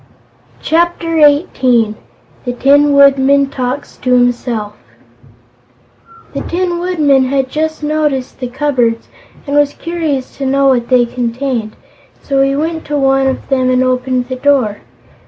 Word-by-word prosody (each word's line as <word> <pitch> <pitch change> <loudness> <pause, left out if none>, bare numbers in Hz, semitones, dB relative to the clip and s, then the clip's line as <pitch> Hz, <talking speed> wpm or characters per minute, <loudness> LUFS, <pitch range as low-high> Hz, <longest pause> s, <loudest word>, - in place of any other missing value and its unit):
Chapter 330 0 0
Eighteen 260 - +3 0.5
The 245 - -3
Tin 285 +3 +3
Woodman 280 0 +4
Talks 255 +2 -4
to 255 - -3
Himself 245 -3 0 1.6
The - - -3
Tin 350 0 -2
Woodman 300 -7 +2
had 265 0 -1
just 315 0 -3
noticed 295 -5 -2
the 250 - -3
cupboards 245 -3 -1 0.4
and 285 -1 -3
was 290 -1 +2
curious 320 -6 -3
to 275 - -4
know 275 +1 +2
what 240 -3 0
they 250 -2 +4
contained, 240 -1 -3 0.4
so 275 -1 -1
he 275 0 +1
went 320 +2 -2
to 295 0 -2
one 270 -1 +2
of 265 - -3
them 260 -2 +1
and 255 0 +2
opened 255 -1 -1
the 255 - -4
door. 255 -7 +1
270 Hz, 135 wpm, -14 LUFS, 250-290 Hz, 1.6 s, Woodman